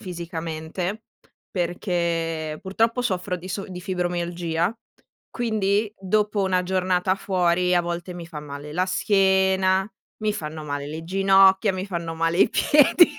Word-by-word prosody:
fisicamente, 170 +2 -5 0.5
perché 170 -3 -2
purtroppo 225 +5 +1
soffro 185 -5 -1
di 180 +1 -10
so 195 +1 -3
di 180 -1 -7
fibromialgia, 175 0 -1 0.6
quindi 215 -3 0
dopo 205 +1 +1
una 185 -1 +1
giornata 185 0 +1
fuori 180 -2 +1
a 175 - +3
volte 175 +1 -4
mi 170 -1 -7
fa 155 -3 -7
male 145 0 -8
la 180 +3 +1
schiena, 190 0 +2 0.3
mi 215 - +1
fanno 155 -5 -6
male 145 -1 -4
le 160 +2 -6
ginocchia, 195 +2 +4
mi 185 +1 -4
fanno 170 -3 -4
male 165 +2 0
i - - +6
piedi, 300 +4 +5
180 Hz, 135 wpm, -24 LUFS, 170-195 Hz, 0.6 s, i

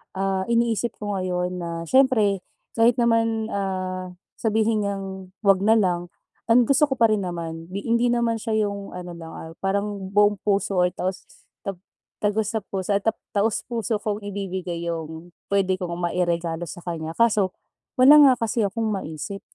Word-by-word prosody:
ah, 190 0 0
iniisip 235 -1 +1
ko 205 -1 -4
ngayon 180 0 -2
na 170 - -4
siyempre 215 -2 +3 0.4
kahit 235 +1 +5
naman, 230 -2 +1
ah, 185 -2 -3 0.2
sabihin 220 0 +1
niyang 195 -1 -3 0.4
'wag 195 -2 +5
na 220 +3 +4
lang 175 -5 +1 0.4
ang 240 0 +6
gusto 275 +2 +4
ko 265 - -2
pa 230 - +6
rin 215 -3 +1
naman. 165 -1 -6
Di 200 +1 -3
hindi 235 +1 +3
naman 235 -1 +1
siya 220 -2 0
yung 200 0 -6
ano 180 -1 -7
lang, 165 -1 -9
ah, 160 - -8
parang 200 0 -2
buong 205 +1 +4
puso 195 -2 +1
ay 180 - +2
taos, 185 +1 -3 0.4
ta 195 - -2 0.5
tagos 210 0 0
sa 220 - 0
puso 190 -1 -4
ay 200 - +3 0.3
taos-puso 225 +1 0
kong 210 -1 -2
ibibigay 185 -4 -4
yung 165 0 -5 0.2
pwede 190 -1 +1
kong 170 -2 -3 0.2
mairegalo 170 -1 -1
sa 175 +2 -9
kanya 165 -2 -5
kaso 210 -5 +2 0.4
wala 275 +4 +8
nga 280 -3 +8
kasi 230 0 0
akong 225 +4 -3
maisip. 195 +1 -5
200 Hz, 165 wpm, -24 LUFS, 180-225 Hz, 0.5 s, wala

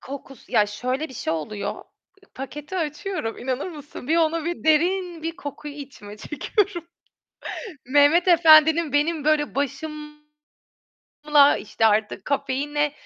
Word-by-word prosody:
Kokusu 270 -2 -10
ya 210 - +4
şöyle 255 +8 -3
bir 260 - -12
şey 160 - -2
oluyor. 165 +6 -4 0.4
I - - -21
paketi 295 +6 -7
açıyorum, 320 - -3
inanır 260 +6 -3
mısın? 295 -4 -10
Bir 325 - +3
onu 330 -1 +1
bir 345 -1 -4
derin 345 +2 +1
bir 330 +1 -4
kokuyu 290 +1 -8
içime 255 -8 -10
çekiyorum. 365 - -1 1.1
Mehmet 290 +7 +4
Efendi'nin 320 -2 +6
benim 300 +1 +1
böyle 300 -1 +1
başımla, 300 +1 -6 1.1
işte, 225 +1 0
artık 210 -2 +1
kafeine 290 +1 -1
295 Hz, 125 wpm, -23 LUFS, 265-320 Hz, 1.1 s, Efendi'nin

